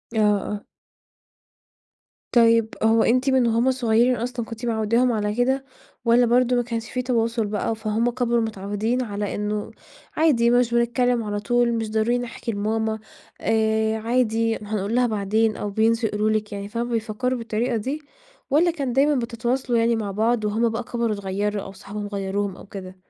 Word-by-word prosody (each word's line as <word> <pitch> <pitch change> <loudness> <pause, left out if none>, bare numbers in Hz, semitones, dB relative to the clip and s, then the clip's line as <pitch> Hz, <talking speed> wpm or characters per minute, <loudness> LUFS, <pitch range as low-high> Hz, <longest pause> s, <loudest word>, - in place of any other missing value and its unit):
آه، - - +2
آه. 210 0 0 1.7
طيب، 230 -2 +5
هو 225 0 +4
أنتِ 255 +3 +2
من 260 -3 +3
وهم 235 +3 +2
صغيرين 240 0 +2
أصلًا، 240 0 -3
كنتِ 230 +2 -7
معوداهم 230 +2 +2
على 210 -1 -1
كده، 265 +2 +1 0.4
والَّا 240 +1 +5
برضه 250 +1 +3
ما 245 - +3
كانش 230 -1 -4
في 250 - -1
تواصل 230 -3 0
بقى، 210 +2 -1
فهم 220 +2 0
كبروا 235 -1 +1
متعودين 215 +3 -2
على 205 -2 -3
إنه 210 +1 -3 0.5
عادي 260 -7 +4
مش 245 -1 +3
بنتكلم 240 0 +2
على 205 -1 -3
طول، 240 +2 +1
مش 225 -2 -2
ضروري 220 +3 +1
نحكي 240 -1 -5
لماما، 220 +1 -1 0.4
آآ 220 0 +1
عادي 225 -1 +1
هنقول 210 +1 -3
لها 250 -1 +3
بعدين، 215 +1 0
أو 205 - -3
بينسوا 225 +2 +2
يقولوا 210 +1 0
لِك 215 -1 -1
يعني. 200 0 -5
فهُم 235 +2 -3
بيفكروا 235 +3 -1
بالطريقة 230 +2 -1
دي، 275 +8 -3 0.5
والَّا 330 +5 +4
كان 275 -7 -3
دايمًا 285 +2 +3
بتتواصلوا 240 +1 -1
يعني 230 0 +3
مع 210 -3 -3
بعض، 220 +2 +1
وهم 225 +3 +1
بقى 225 +2 -3
كبروا 235 -2 -1
اتغيروا 200 +1 -2
أو 195 - -8
صحابهم 205 +2 -7
غيروهم 200 -1 -2
أو - - -12
كده؟ 190 -2 -9
225 Hz, 165 wpm, -23 LUFS, 210-245 Hz, 1.7 s, طيب